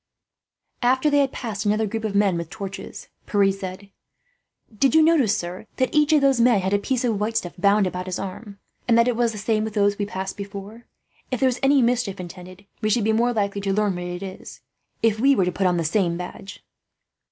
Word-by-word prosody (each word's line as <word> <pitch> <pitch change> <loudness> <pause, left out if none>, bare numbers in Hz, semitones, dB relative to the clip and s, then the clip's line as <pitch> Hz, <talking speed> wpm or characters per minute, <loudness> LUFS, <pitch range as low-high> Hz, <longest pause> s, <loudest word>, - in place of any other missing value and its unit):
After 260 +4 +2
they 285 - +4
had 275 -2 +2
passed 215 -5 -5
another 215 +1 +1
group 220 +2 -4
of 210 -2 -3
men 200 -3 +3
with 170 -1 -4
torches, 195 -2 -8 0.2
Pierre 200 -2 +3
said: 195 0 -8 0.8
"Did 270 +7 +2
you 320 - +7
notice, 300 -10 +3
sir, 180 +5 -6
that 255 -2 0
each 300 0 +3
of 305 -2 +5
those 270 -3 +3
men 235 -3 +4
had 190 +2 -1
a 205 - +3
piece 255 +4 -1
of 225 -5 0
white 220 +2 -1
stuff 175 -6 -3
bound 200 +2 +3
round 180 +1 -5
his 185 - -3
arm, 200 +2 -7 0.3
and 230 -1 +4
that 235 +1 +4
it 245 - +1
was 235 0 +1
the 215 - -8
same 215 +1 0
with 220 0 -5
those 205 0 +2
we 205 - -1
passed 190 -1 -5
before? 200 +3 -8 0.4
If 255 - -2
there 265 - +4
is 250 - -3
any 270 -1 +4
mischief 235 -5 0
intended, 180 +2 -10 0.2
we 215 - 0
should 215 +1 +2
be 220 +1 +2
more 235 +2 +2
likely 200 -3 -1
to 195 -1 -1
learn 210 -1 +1
what 175 0 -5
it 175 +1 -5
is 190 -1 -9 0.4
if 220 -1 +2
we 275 +3 +4
were 190 - +2
to 180 - 0
put 190 +1 0
on 180 -1 +1
the 170 - 0
same 170 0 +1
badge." 180 +2 -9
210 Hz, 230 wpm, -23 LUFS, 195-235 Hz, 0.8 s, you